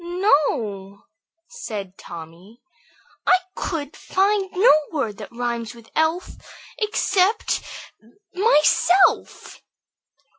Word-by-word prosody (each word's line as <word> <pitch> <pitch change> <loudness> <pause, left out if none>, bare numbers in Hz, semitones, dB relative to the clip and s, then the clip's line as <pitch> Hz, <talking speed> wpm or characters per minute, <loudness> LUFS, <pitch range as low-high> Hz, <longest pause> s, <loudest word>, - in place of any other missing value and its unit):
"No," 235 - 0 0.4
said 210 - -7
Tommy, 170 +8 -12 0.7
"I 370 - +6 0.2
could 300 -4 -4
find 390 0 0
no 395 +7 +5 0.2
word 250 -10 -3
that - - -9
rhymes 235 -1 -4
with 230 -1 -17
'elf' 320 +3 0 0.4
except 415 -1 +1 0.7
'myself.'" 365 -1 +2
300 Hz, 80 wpm, -22 LUFS, -, 0.7 s, I